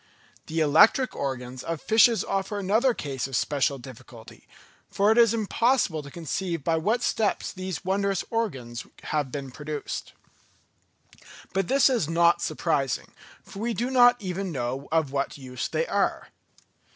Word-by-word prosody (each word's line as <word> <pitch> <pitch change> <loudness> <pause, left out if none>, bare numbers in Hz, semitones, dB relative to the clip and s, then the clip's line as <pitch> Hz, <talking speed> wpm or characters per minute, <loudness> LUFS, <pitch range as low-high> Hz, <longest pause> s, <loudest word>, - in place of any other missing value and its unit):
The 160 +1 -1
electric 160 - +5
organs 130 -2 -4
of 165 +2 -4
fishes 225 - +4
offer 195 +2 -2
another 215 +7 +2
case 135 -3 -4
of 135 - -5
special 140 +2 +1
difficulty; 120 -2 -13 0.4
for 205 +2 +2
it 220 - +2
is 230 -2 +6
impossible 230 - +1
to 145 - -11
conceive 170 +1 -4
by 165 +1 +1
what 215 +9 0
steps 215 -2 0
these 185 -4 -5
wondrous 195 0 0
organs 130 - -3 0.2
have 145 -4 -2
been 140 -2 -5
produced. 150 +2 -6 1.4
But 190 -1 0
this 275 +1 +4
is 240 - +1
not 170 +1 +3
surprising, 140 -6 -1 0.3
for 195 - -11
we 230 +1 -2
do 245 +3 -2
not 245 -1 +6
even 190 -1 -4
know 130 0 -4
of 160 -4 +1
what 140 +1 -2
use 130 -2 -5
they 485 - -1
are. - - -1
170 Hz, 150 wpm, -26 LUFS, 140-215 Hz, 1.4 s, is